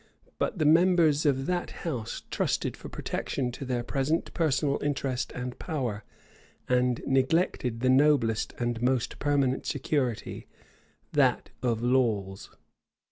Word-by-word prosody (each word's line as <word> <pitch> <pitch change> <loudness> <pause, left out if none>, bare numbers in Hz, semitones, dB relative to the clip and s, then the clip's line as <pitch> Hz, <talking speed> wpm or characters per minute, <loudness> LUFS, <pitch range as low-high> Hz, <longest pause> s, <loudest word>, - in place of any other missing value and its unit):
But - - -1
the 155 - +1
members 160 -2 +4
of 135 -1 +1
that 180 +1 -1 0.2
house 125 -9 -4
trusted - - -1
for - - -10
protection 125 -3 -3
to 125 - -7
their 125 -2 -1
present 140 +6 -1
personal 145 -3 +1
interest 135 -3 -1
and 125 0 -5
power, 125 - -3 0.6
and 125 -1 +1
neglected 130 -3 +1
the 130 - +2
noblest 130 -5 +3
and 120 -1 -2
most 125 -1 0
permanent 140 -3 +1
security, 135 -4 -2 0.6
that - - +2
of 115 -2 0
laws. 110 -7 0
130 Hz, 125 wpm, -28 LUFS, 120-150 Hz, 0.6 s, members